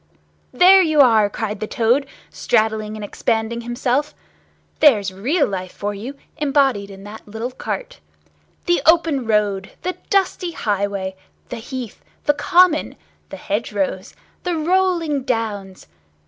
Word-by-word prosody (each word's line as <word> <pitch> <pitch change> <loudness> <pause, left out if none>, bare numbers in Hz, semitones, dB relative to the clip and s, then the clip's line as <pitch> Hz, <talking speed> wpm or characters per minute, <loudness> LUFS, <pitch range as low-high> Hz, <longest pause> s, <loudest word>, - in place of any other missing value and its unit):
"There 380 +2 +7
you 310 -4 +2
are!" 220 -5 +5
cried 210 0 -4
the 215 - -4
Toad, 245 +4 +1 0.2
straddling 215 -1 0
and 215 -1 -6
expanding 225 +2 -1
himself. 250 +4 -1 0.6
"There's 210 -10 +4
real 280 - +1
life 185 -2 -5
for 205 0 -4
you, 230 +8 -7 0.2
embodied 275 -8 +1
in 195 0 -11
that 210 +2 -11
little 225 +4 -5
cart. - - -6 0.7
The 350 0 +2
open 320 -7 +3
road, 205 -3 0
the 365 +1 -2
dusty 375 -3 0
highway, 200 -4 -2 0.3
the 245 - -5
heath, 245 -1 -7 0.2
the 295 - +3
common, 355 0 +3 0.3
the - - -8
hedgerows, 200 -2 -3 0.3
the 355 -2 -2
rolling 335 -3 +1
downs! 210 -6 -3
235 Hz, 130 wpm, -20 LUFS, 205-300 Hz, 0.7 s, There